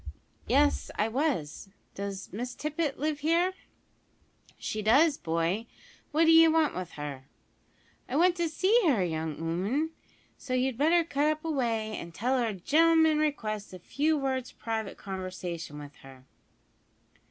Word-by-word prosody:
"Yes, 285 Hz, +4 st, +2 dB
I 210 Hz, -, +1 dB
was. 225 Hz, -, -2 dB, 0.2 s
Does 200 Hz, -1 st, -6 dB
Miss 245 Hz, +4 st, -4 dB
Tippet 305 Hz, -1 st, -2 dB
live 300 Hz, 0 st, -1 dB
here?" 335 Hz, +5 st, +2 dB, 1.0 s
"She 215 Hz, -, -4 dB
does, 280 Hz, +9 st, +4 dB
boy, 170 Hz, +7 st, -1 dB, 0.4 s
what 315 Hz, +2 st, +3 dB
d'ye 325 Hz, 0 st, +8 dB
want 320 Hz, -2 st, +3 dB
with 185 Hz, -2 st, -6 dB
her?" 145 Hz, -3 st, -7 dB, 0.8 s
"I 255 Hz, -, -3 dB
want 350 Hz, +3 st, +4 dB
to 340 Hz, -1 st, 0 dB
see 385 Hz, +9 st, +3 dB
her, 235 Hz, -11 st, +3 dB
young 160 Hz, -2 st, -2 dB
'ooman, 195 Hz, -, -1 dB, 0.5 s
so 255 Hz, -2 st, -3 dB
you'd 255 Hz, 0 st, 0 dB
better 335 Hz, +4 st, +4 dB
cut 300 Hz, -1 st, +1 dB
away 235 Hz, -8 st, -1 dB
up -, -, -4 dB
an' 170 Hz, 0 st, -10 dB
tell 255 Hz, +8 st, 0 dB
her 235 Hz, -, +1 dB
a 220 Hz, -, -2 dB
gen'lm'n 320 Hz, -, +4 dB
requests 215 Hz, -10 st, -2 dB
a -, -, -7 dB
few 300 Hz, -, 0 dB
words 260 Hz, -2 st, -2 dB
private 220 Hz, -3 st, -4 dB
conversation 185 Hz, -5 st, -6 dB
with 145 Hz, -1 st, -10 dB
her." 135 Hz, -1 st, -15 dB
255 Hz, 145 wpm, -29 LUFS, 185-310 Hz, 1.0 s, d'ye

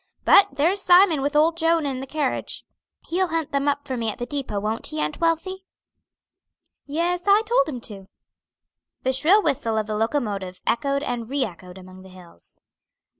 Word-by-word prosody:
But 400 Hz, -, +7 dB
there's 335 Hz, +8 st, +1 dB
Simon 355 Hz, -5 st, +5 dB
with 285 Hz, +2 st, -2 dB
old 320 Hz, +2 st, +3 dB
Joan 330 Hz, -1 st, +2 dB
and 265 Hz, -2 st, -3 dB
the 270 Hz, -, -7 dB
carriage. 290 Hz, -2 st, -3 dB, 0.4 s
He'll 370 Hz, +2 st, +1 dB
hunt 325 Hz, -2 st, -2 dB
them 280 Hz, 0 st, -1 dB
up 285 Hz, 0 st, 0 dB
for 260 Hz, -, -3 dB
me 230 Hz, -2 st, -2 dB
at 210 Hz, -, -5 dB
the 240 Hz, -, -4 dB
depot; 270 Hz, -6 st, -3 dB
won't 215 Hz, +2 st, -3 dB
he, 155 Hz, -, -5 dB
Aunt 150 Hz, 0 st, -2 dB
Wealthy?" 335 Hz, +3 st, -1 dB, 1.2 s
"Yes, 345 Hz, +4 st, -1 dB
I 405 Hz, +2 st, +5 dB
told 440 Hz, -, +2 dB
him 255 Hz, -5 st, -5 dB
to." 195 Hz, -4 st, -9 dB, 1.0 s
The 260 Hz, -, +1 dB
shrill 340 Hz, +11 st, +4 dB
whistle 240 Hz, -7 st, 0 dB
of 215 Hz, -, 0 dB
the 215 Hz, 0 st, -4 dB
locomotive 210 Hz, -6 st, -2 dB
echoed 280 Hz, +3 st, 0 dB
and 235 Hz, -4 st, -4 dB
re 280 Hz, 0 st, 0 dB
echoed 180 Hz, -1 st, -11 dB
among 185 Hz, 0 st, -13 dB
the 190 Hz, -, -14 dB
hills. 180 Hz, -, -17 dB
275 Hz, 180 wpm, -23 LUFS, 215-330 Hz, 1.2 s, But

